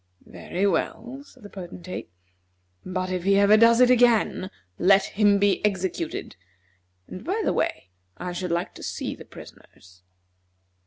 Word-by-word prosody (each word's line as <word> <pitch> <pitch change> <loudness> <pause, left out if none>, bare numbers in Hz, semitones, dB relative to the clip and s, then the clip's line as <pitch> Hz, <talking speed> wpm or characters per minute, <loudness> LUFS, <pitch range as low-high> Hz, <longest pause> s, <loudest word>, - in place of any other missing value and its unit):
"Very 185 +3 -4
well," 235 +8 -2
said 285 - -20
the 205 - -10
Potentate; 185 -1 -8 0.7
"but 185 0 -3
if 185 -1 -2
he 195 +1 +3
ever 200 +1 +6
does 230 +2 +5
it 250 0 +6
again, 235 -6 +3 0.3
let 195 +2 +5
him 205 -1 +2
be 200 0 +1
executed; 190 -5 -2 0.7
and, 185 - -9
by 385 +7 -2
the - - +1
way, 90 - -2 0.3
I 180 - -5
should 180 0 -4
like 170 +1 -2
to - - -12
see - - -4
the - - -12
prisoners." 90 -1 -16
195 Hz, 150 wpm, -24 LUFS, 180-215 Hz, 0.7 s, ever